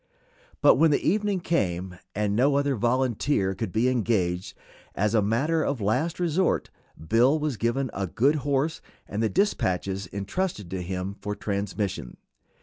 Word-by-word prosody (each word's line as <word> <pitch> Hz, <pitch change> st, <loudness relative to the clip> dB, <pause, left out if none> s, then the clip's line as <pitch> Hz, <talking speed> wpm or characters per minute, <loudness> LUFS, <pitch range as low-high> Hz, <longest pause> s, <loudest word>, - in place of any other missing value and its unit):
But -, -, +7 dB
when 160 Hz, -1 st, +5 dB
evening 200 Hz, +2 st, +1 dB
came 90 Hz, -, -1 dB, 0.2 s
and 105 Hz, 0 st, 0 dB
no 135 Hz, +5 st, +3 dB
other 140 Hz, -1 st, +1 dB
volunteer 120 Hz, -3 st, +1 dB
could 95 Hz, 0 st, -4 dB
be 110 Hz, +5 st, +2 dB
engaged, 100 Hz, -8 st, 0 dB, 0.4 s
as 105 Hz, +3 st, +1 dB
a 110 Hz, -, +4 dB
matter 135 Hz, +11 st, +1 dB
of 140 Hz, -4 st, -1 dB
last 125 Hz, -, 0 dB
resort 175 Hz, +1 st, +1 dB, 0.4 s
Bill 125 Hz, -, +4 dB
was 150 Hz, -3 st, -1 dB
given 120 Hz, +3 st, -1 dB
a 95 Hz, -1 st, -2 dB
good 140 Hz, -, +2 dB
horse 145 Hz, +3 st, -1 dB, 0.3 s
and 105 Hz, +2 st, -3 dB
the 110 Hz, -, +2 dB
dispatches 95 Hz, -, 0 dB
intrusted 105 Hz, -, -3 dB
to 95 Hz, -1 st, -3 dB
him 95 Hz, +2 st, -4 dB
for 105 Hz, 0 st, -3 dB
transmission. 100 Hz, -, -3 dB
115 Hz, 145 wpm, -26 LUFS, 100-145 Hz, 0.4 s, But